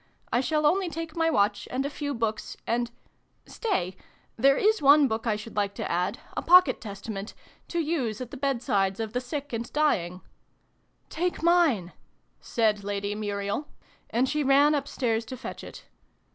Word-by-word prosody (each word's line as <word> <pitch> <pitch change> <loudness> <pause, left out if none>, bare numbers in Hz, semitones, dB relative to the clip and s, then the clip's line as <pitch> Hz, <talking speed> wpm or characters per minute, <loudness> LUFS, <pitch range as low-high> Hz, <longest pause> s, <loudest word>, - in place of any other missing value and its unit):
I 240 - +3
shall 300 +4 0
only 360 +4 +3
take 330 -1 -6
my 325 -1 +2
watch, 205 -6 +1
and 265 +2 -1
a - - +1
few 285 -1 -3
books, 225 -2 -3
and 240 +1 0 0.6
stay 185 - -2 0.4
there 275 +4 +4
is 435 +1 +3
one 285 0 +7
book 225 0 -3
I 215 - +2
should 215 +2 -8
like 200 -1 0
to - - -3
add, 180 +3 0 0.2
a - - -1
pocket 360 +1 +6
Testament 200 -1 -6 0.3
to 345 - -4
use 290 -10 -1
at 250 -2 -6
the - - -7
bedsides 230 -8 0
of 220 -1 -3
the 250 - 0
sick 280 +2 -5
and 230 +1 -4
dying 185 - +1 0.5
" - - -43
Take 355 -2 -1
mine! 320 - +3 0.3
" - - -43 0.2
said 215 -3 +2
Lady 200 0 -2
Muriel: 205 +5 -3 0.4
and 250 +3 +1
she 300 +2 0
ran 280 +2 +5
upstairs 250 -5 -1
to 255 +3 -7
fetch - - -7
it. - - -10
245 Hz, 175 wpm, -27 LUFS, 210-295 Hz, 0.6 s, one